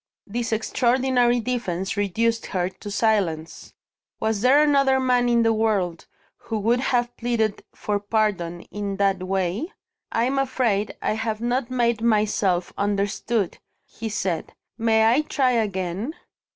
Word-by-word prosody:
This 235 +3 -3
extraordinary 245 +2 +2
defence 205 -7 -2
reduced 225 +3 0
her 180 -2 -1
to 205 +2 -10
silence. 195 -7 -1 0.4
Was 220 -2 0
there 270 +5 +5
another 275 -3 +3
man 250 -2 +2
in 235 -1 +3
the 225 0 +3
world 205 -6 0 0.3
who 225 - -4
would 230 +4 +2
have 245 -2 0
pleaded 225 -3 -1
for 205 -1 -1
pardon 200 -5 -1
in 200 -1 -4
that 195 -2 +1
way? 190 - -1 0.4
"I'm 255 +4 +1
afraid 240 -6 0
I - - +1
have 220 0 -2
not 240 +1 -1
made 235 -3 +1
myself 210 -5 +1
understood," 205 +1 -1 0.3
he 225 0 -6
said. 195 -5 -3 0.2
"May 220 -1 +3
I 245 +6 +4
try 270 -4 +1
again?" 205 - -2
220 Hz, 135 wpm, -24 LUFS, 200-240 Hz, 0.4 s, there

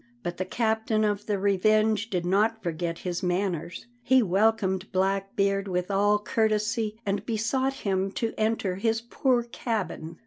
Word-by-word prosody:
But 175 -2 -4
the 185 - -2
captain 220 +1 0
of 210 0 -1
the 205 -2 0
Revenge 215 +2 +2
did 180 -4 -1
not 215 +5 +1
forget 170 -1 -2
his 175 0 -2
manners. 175 -2 -2 0.2
He 260 +1 +4
welcomed 195 -1 +1
Blackbeard 195 +1 0
with 180 +1 -2
all 205 +1 +3
courtesy 215 +1 0
and 200 0 -1
besought 235 +4 0
him 195 0 0
to 225 -1 -2
enter 215 -4 0
his 225 +2 +1
poor 245 +1 +1
cabin. 210 -8 -4
205 Hz, 145 wpm, -27 LUFS, 190-220 Hz, 0.2 s, He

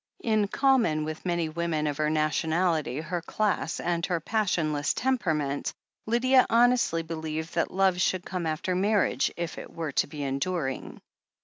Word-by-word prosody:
In 215 -3 +2
common 235 - +2
with 155 +4 -5
many 170 -2 0
women 160 -1 -1
of 145 -1 -1
her 155 0 +1
nationality, 155 -1 0
her 170 +2 -3
class, 205 -3 -1
and 170 -1 -1
her 175 -2 0
passionless 165 -7 0
temperament, 160 - -1 0.3
Lydia 255 +3 +4
honestly 235 -8 +3
believed 160 0 -5
that - - 0
love 190 -1 +2
should 185 0 +1
come 180 -3 -3
after 155 +4 -1
marriage 200 +3 +2
if 170 -1 -4
it - - -10
were 165 -3 -4
to - - +1
be 145 0 -6
enduring. 135 +1 -3
170 Hz, 150 wpm, -27 LUFS, 155-195 Hz, 0.3 s, Lydia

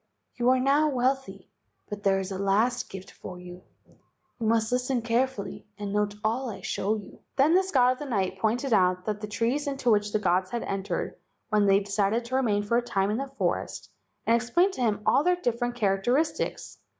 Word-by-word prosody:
You 245 0 +2
are 260 0 +4
now 285 +4 +3
wealthy, 265 0 -1 0.4
but 205 0 -6
there 195 -1 +3
is 190 0 -4
a 190 - -4
last 215 +6 +1
gift 190 -1 -9
for 180 - -9
you. 180 0 -10 0.8
You 225 - -1
must 225 0 +2
listen 250 -1 0
carefully 235 -3 -1
and 205 -1 -4
note 205 0 0
all 235 +4 0
I 215 - -7
show 210 +3 -1
you." 210 -2 -10 0.2
Then 280 +4 +4
this 375 +1 +3
god 250 -6 +4
of 255 - -4
the 295 - -5
night 190 -6 -1
pointed 235 +5 0
out 180 -2 +3
the 215 - 0
trees 235 +8 -1
into 270 -4 0
which 210 -1 +2
the - - +2
gods 185 -2 +1
had 235 +2 -3
entered 195 0 -3 0.3
when 210 -2 +3
they 195 +1 +5
decided 205 +3 0
to 255 +2 -3
remain 215 -6 +1
for 235 +3 +1
a - - +3
time 200 -4 0
in 215 - 0
the 275 +2 -3
forest, 270 0 -3 0.3
and 230 - +4
explained 345 - +2
to 255 - -5
him 210 -3 0
all 270 +5 +4
their 360 +2 +3
different 245 -6 -2
characteris¬ 240 +8 +1
tics. - - -5
230 Hz, 205 wpm, -27 LUFS, 200-255 Hz, 0.8 s, they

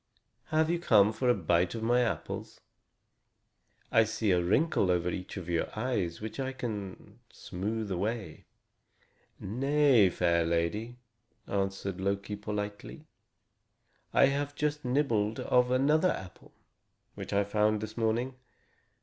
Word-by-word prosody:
Have 160 +1 +1
you 175 - 0
come 110 -9 +4
for 125 +3 0
a 120 - +5
bite 85 +1 +1
of 110 - -4
my 120 +2 +3
apples? 120 - -3 1.3
I 115 - +6
see 110 -1 -1
a 90 -1 +3
wrinkle 100 - +2
over 90 0 +1
each 90 +3 -6
of 90 -3 -6
your 85 -1 0
eyes 105 -8 -1
which 110 +5 -7
I 135 0 -2
can 105 -7 -6
smooth 105 +3 -4
away." 100 -1 -3 0.9
"Nay, 135 -1 +3
fair 85 -1 +1
lady," 85 +9 -1 0.5
answered 95 -1 -3
Loki 100 +1 -2
politely, 105 +7 -6 1.1
"I - - +5
have 140 +1 -1
just 150 0 -1
nibbled 120 -5 0
of 125 0 +2
another 150 +7 +3
apple, 95 - -7 0.6
which - - -8
I 100 0 +2
found 105 +1 +1
this 110 +1 -6
morning. 115 +3 0
110 Hz, 130 wpm, -30 LUFS, 95-125 Hz, 1.3 s, I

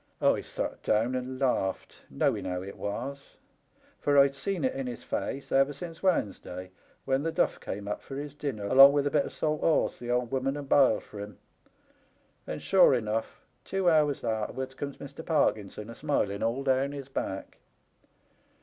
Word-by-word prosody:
I - - +3
sot - - -5
down 115 +4 +1
and 130 0 -3
laughed, 110 -8 0
knowing - - 0
how 90 0 -3
it 100 - -8
was, 135 +7 -5 0.6
for 145 -1 +2
I'd 140 0 +6
seen 170 +5 -3
it 130 - +1
in 135 -1 -4
his 120 - -6
face 140 - -4
ever 135 +2 +3
since 165 +3 -8
Wednesday, 95 - -1 0.3
when 135 0 +1
the 165 +2 -1
duflf - - +1
came 100 +1 -6
up 105 - -3
for 135 - -9
his 145 0 -5
dinner, 135 -8 -4
along 135 +6 +8
with 145 -1 +2
a 145 - 0
bit 145 -1 +2
of - - -6
salt 155 -1 -1
horse 160 - +2
the 120 - -7
old 125 -1 0
woman 135 +1 0
had 145 -1 -6
biled 135 -5 +4
for 105 - -11
him; 105 +1 -8 1.1
and, - - -5
sure 185 -8 +6
enough, 110 -1 -2 0.2
two 190 -2 +1
hours 150 -3 +2
arterwards 120 +4 -2
comes 140 +1 -6
Mr. 140 +3 -9
Parkinson, 105 - 0
a 115 - -8
smiling 115 -9 -1
all 120 +4 0
down 135 +1 +1
his 140 -2 -7
back. 95 -7 -5
135 Hz, 180 wpm, -29 LUFS, 110-145 Hz, 1.1 s, along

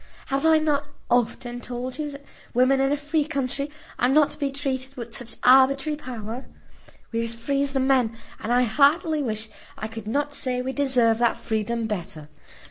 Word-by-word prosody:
Have 275 +3 +1
I 320 0 +6
not 295 -2 +1 0.2
often 245 0 0
told 250 +3 -5
you 300 -1 -2
that 280 0 -10 0.3
women 255 +2 +4
in 270 +1 +2
a 290 - +2
free 295 +1 0
country 280 -1 -2 0.3
are 245 - +3
not 295 +2 +4
to - - -10
be 280 -2 0
treated 270 -1 -3
with 235 -1 -6
such 235 -3 -6
arbitrary 270 +3 +5
power? 245 -3 -7 0.7
We 230 - -1
are - - 0
as 230 0 -2
free 275 +4 -1
as 280 -1 -1
the 270 - +1
men, 260 -4 +2 0.2
and 225 - -3
I 245 +1 +4
heartily 300 - +3
wish 220 -4 -2 0.3
I 215 - -4
could 225 -1 -8
not 290 +5 -1
say 255 -3 0
we 260 +1 -3
deserve 250 -5 +3
that 235 -1 +2
freedom 225 +1 -2
better. 170 -8 -5
260 Hz, 195 wpm, -25 LUFS, 235-280 Hz, 0.7 s, I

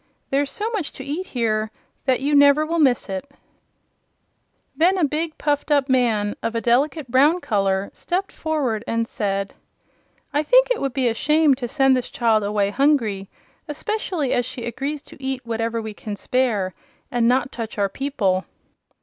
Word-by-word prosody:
There's 280 +1 +1
so 420 +8 -2
much 400 -10 -3
to 265 - -8
eat 300 +7 -4
here 220 -3 -1 0.4
that 260 -1 +2
you 290 +2 0
will 285 - +7
never 285 +2 +5
miss 260 -6 +3
it." 195 +7 -5 1.5
Then 360 +4 +3
a 360 - +1
big, 310 +2 -2
puffed 290 0 -1
up 285 -2 +2
man, 225 -5 +2
of 230 0 -2
a - - +2
delicate 265 +3 +1
brown 290 +7 +4
color, 195 - 0
stepped 370 +2 -3
forward 275 -9 -1
and 230 0 0
said: 200 -3 -2 0.8
"I 290 - +2
think - - +4
it - - 0
would 275 -2 -1
be 260 -2 +2
a 230 - +2
shame 300 +4 +3
to 250 -2 -3
send 270 0 +3
this 255 - -2
child 225 -3 +2
away 205 -1 0
hungry, 225 -8 +1 0.4
especially 320 -2 -2
as 245 - +2
she 250 -1 -6
agrees 275 +5 -4
to - - -15
eat 265 -1 -3
whatever 230 0 -2
we 220 -1 -6
can 205 0 -6
spare 210 -5 0 0.4
and 240 -1 +2
not 255 +1 +2
touch 225 -2 -6
our 200 -1 +2
people." 200 -8 -1
260 Hz, 175 wpm, -22 LUFS, 225-295 Hz, 1.5 s, will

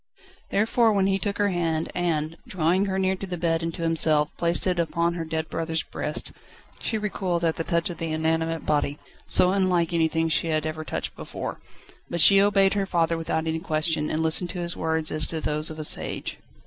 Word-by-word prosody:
Therefore 225 +2 +2
when 195 -2 +2
he 195 0 +1
took 200 +2 -2
her 205 0 +2
hand 165 -3 -1
and, 165 -3 -1
drawing 180 +3 +1
her 190 0 -1
nearer 190 0 +1
to 195 - -6
the 180 -1 -4
bed 165 -1 0
and 165 0 -2
to 170 - -5
himself, 155 -2 +4
placed 170 0 +1
it 180 -2 +1
upon 170 0 0
her 170 -1 -4
dead 160 0 -3
brother's 165 -1 -2
breast, - - -4 0.5
she 220 - -1
recoiled 190 -5 -2
at 160 - 0
the 165 - -1
touch 170 0 0
of 170 - -9
the 165 -1 -3
inanimate 160 +1 -1
body, 145 -1 0 0.3
so 180 - +3
unlike 180 -3 +1
anything 160 0 +1
she 160 +1 +1
had 155 -1 0
ever 155 0 -4
touched - - -4
before, - - -6 0.5
but 170 - -3
she 195 +4 +8
obeyed 195 -1 +3
her 200 -2 -1
father 170 -2 +1
without 160 0 -2
any 160 0 -1
question, 155 -2 0
and 160 +1 -1
listened 160 +2 +2
to 175 - -4
his 170 0 -3
words 160 -1 0
as 155 -1 +3
to 160 - -2
those 150 0 -1
of 155 - -8
a 155 - -4
sage. - - -1
165 Hz, 210 wpm, -25 LUFS, 160-185 Hz, 0.5 s, she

